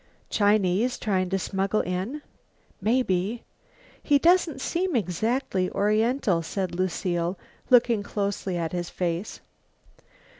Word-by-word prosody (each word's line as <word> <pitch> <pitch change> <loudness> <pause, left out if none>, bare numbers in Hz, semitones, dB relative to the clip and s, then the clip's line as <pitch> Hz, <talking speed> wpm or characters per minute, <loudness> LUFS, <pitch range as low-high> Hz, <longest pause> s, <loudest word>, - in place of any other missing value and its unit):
"Chinese, 205 +2 +2
trying 185 -4 0
to 195 - +1
smuggle 195 +2 0
in?" 190 +12 -3 0.6
"Maybe." 220 -1 0 0.6
"He 290 - +4
doesn't 335 -1 +3
seem 350 +4 -1
exactly 195 - 0
oriental," 215 -2 +1
said 185 +2 -3
Lucile, 175 0 -1 0.3
looking 240 -3 +5
closely 200 -3 -2
at 165 -2 -2
his 175 -1 -3
face. 175 +2 -3
200 Hz, 105 wpm, -26 LUFS, 180-240 Hz, 0.6 s, looking